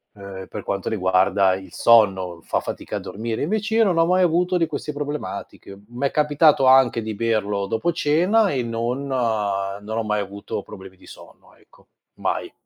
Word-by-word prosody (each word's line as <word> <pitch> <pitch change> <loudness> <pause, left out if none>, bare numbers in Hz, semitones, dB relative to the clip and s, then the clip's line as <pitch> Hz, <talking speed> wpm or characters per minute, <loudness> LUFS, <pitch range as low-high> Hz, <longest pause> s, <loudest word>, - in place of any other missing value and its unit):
ehm, 100 -1 -9
per - - -7
quanto 100 -1 -3
riguarda 95 -1 +2
il 95 0 -10
sonno, 95 -7 +3
fa - - -1
fatica - - -5
a - - -4
dormire, 110 +2 -5
invece 210 +6 -1
io 225 - +5
non 180 -4 +1
ho 165 - +4
mai 180 +2 +2
avuto 180 +1 +2
di 165 -2 +1
queste 150 - -5
problematiche. 145 -8 -6
M'è 125 +3 -2
capitato 150 -1 +3
anche 130 -3 +5
di 110 -1 -5
berlo 105 -3 -1
dopo 115 - 0
cena, 180 +8 +2
e 130 - -1
non 120 +4 -3
non 105 -4 -2
ho 115 - 0
mai 105 -1 -1
avuto 100 +1 -6
problemi 95 -2 -12
di - - -19
sonno, - - -16
ecco. - - -25 0.3
Mai. - - -3
115 Hz, 175 wpm, -22 LUFS, 100-150 Hz, 0.3 s, io